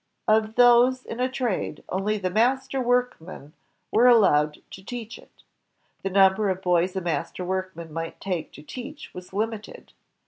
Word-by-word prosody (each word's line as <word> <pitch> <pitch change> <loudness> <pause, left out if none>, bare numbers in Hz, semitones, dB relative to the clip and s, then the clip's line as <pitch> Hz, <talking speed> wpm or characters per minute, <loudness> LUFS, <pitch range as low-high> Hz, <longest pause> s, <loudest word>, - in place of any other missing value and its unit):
Of 220 0 +2
those 245 +1 +5
in 230 - -7
a 255 +1 +1
trade, 250 -6 -3
only 205 +3 -1
the 185 -3 -2
master 260 +5 +1
workmen 240 - -2 0.4
were 235 +3 +5
allowed 155 -11 +4
to 190 - -11
teach 235 +1 -7
it. - - -21 0.6
The 195 - -2
number 195 +2 +4
of 190 0 -3
boys 180 +1 +1
a 190 - -1
master 165 +1 -3
workman 185 -3 -4
might 165 0 -5
take 180 -5 -4
to 145 - -12
teach 270 - -9
was 180 0 -10
limited. 215 +2 -5
200 Hz, 160 wpm, -25 LUFS, 180-245 Hz, 0.6 s, those